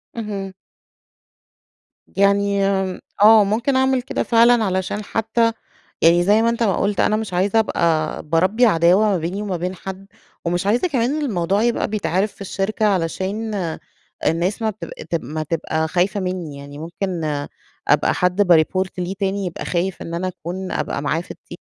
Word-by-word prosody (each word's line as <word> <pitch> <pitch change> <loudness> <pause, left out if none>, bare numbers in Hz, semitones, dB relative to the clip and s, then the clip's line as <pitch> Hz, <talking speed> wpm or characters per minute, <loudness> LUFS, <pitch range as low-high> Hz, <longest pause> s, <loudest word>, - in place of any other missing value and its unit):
اهم. 200 -4 -5 1.5
يعني 200 0 +2 0.3
م - - -11 0.2
آه، 220 0 +8
ممكن 230 +7 0
أعمل 260 0 +2
كده 250 - -2
فعلًا 235 0 +4
علشان 190 +1 -2
حتّى 225 +2 +1 0.5
يعني 170 +2 +5
زي 210 +4 +4
ما 230 - +3
أنت 235 0 0
ما 200 -4 +2
قُلت، 200 0 0
أنا 215 - +3
مش 215 -3 -4
عايزة 195 +5 +2
أبقى 165 -7 0
باربّي 185 +10 +2
عداوة 180 0 +4
ما 195 - +2
بيني 175 +5 -3
وما 195 -4 -2
بين 180 +2 -3
حد. 190 +1 -8 0.4
ومش 175 +3 -1
عايزة 240 - +2
كمان 275 +1 0
الموضوع 200 - 0
يبقى 235 0 +1
بيتعرف 205 -1 -1
في - - -18
الشركة 200 +2 -1
علشان 195 +4 -1 0.7
الناس 180 +7 0
ما 220 - +1
تب 210 - -9 0.2
تب 170 -5 -1
ما 155 +5 -4
تبقى 160 0 -2
خايفة 185 +4 0
منّي، 180 -6 -4
يعني 140 0 -10
ممكن 170 +2 -4 0.6
أبقى - - +3
حد 180 +2 +1
بيreport 185 +1 +3
ليه 180 +1 -2
تاني، 195 0 -1
يبقى 175 - -5
خايف 180 +1 -2
إن 165 - -6
أنا 175 +2 -2
أكون 185 +1 -6
أبقى - - -2
معاه 155 +3 0
في - - -11
الت - - -12
195 Hz, 165 wpm, -20 LUFS, 175-215 Hz, 1.5 s, آه